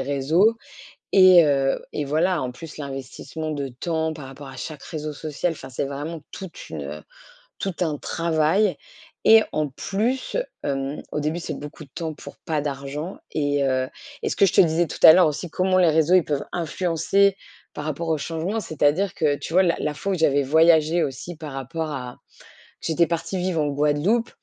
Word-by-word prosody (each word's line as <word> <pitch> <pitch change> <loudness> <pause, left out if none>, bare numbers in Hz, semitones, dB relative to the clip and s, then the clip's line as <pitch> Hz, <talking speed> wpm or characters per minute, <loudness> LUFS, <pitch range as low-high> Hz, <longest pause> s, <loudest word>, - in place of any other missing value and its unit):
réseaux 160 +11 +2 0.6
et, 185 -3 +8
heu, 135 -2 +1
et 145 - -3
voilà, 165 +4 +1
en 125 - -3
plus, 150 +5 -10
l'investissement 140 +3 -6
de 140 -3 -3
temps 160 +5 -2
par 150 -3 -9
rapport 135 +1 -10
à 135 -1 -10
chaque 150 -3 -7
réseau 155 -1 -5
social. 155 +3 -2
Enfin, 135 -4 -10
c'est 130 - -2
vraiment 145 +3 -5
toute 190 -4 -9
une, 75 -3 -5
heu, 75 +2 -7 0.6
tout 195 -3 -3
un 155 -4 0
travail 170 +6 +1 0.5
et 225 0 +8
en 155 -1 0
plus, 225 - -2 0.3
hem, 135 +1 -3
au - - -1
début, 155 +4 -2
c'est 155 -4 -5
beaucoup 150 +1 -9
de 135 - -22
temps 160 -2 -4
pour - - -11
pas 155 -2 0
d'argent 145 +4 -5 0.2
et, 145 -2 0
heu, 130 -1 +1 0.3
et - - 0
ce - - -3
que 195 - +5
je - - 0
te - - +6
disais 170 -1 +3
tout - - -7
à 160 - +12
l'heure 180 0 +6
aussi, 155 +3 -3
comment 185 +3 +1
les 175 -3 +5
réseaux, 160 +3 +3
ils 185 -3 +5
peuvent 145 -2 -2
influencer 180 +3 +1 0.4
par 150 - -5
rapport 155 +2 -3
au 160 - +2
changement. 170 +9 -2
C'est-à-dire 160 +3 +1
que 145 -5 +1
tu - - -7
vois 185 +3 +5
la 170 -2 +2
la 150 - -1
fois 195 +6 -3
où - - +1
j'avais 145 -3 +3
voyagé 160 +3 +4
aussi 150 +5 -4
par 155 -2 -8
rapport 135 +4 -4
à 125 -4 -6 0.6
j'étais 165 0 +2
partie 170 +2 -2
vivre 180 -3 0
en 150 - +1
Guadeloupe. 150 +11 +1
155 Hz, 195 wpm, -23 LUFS, 145-175 Hz, 0.6 s, à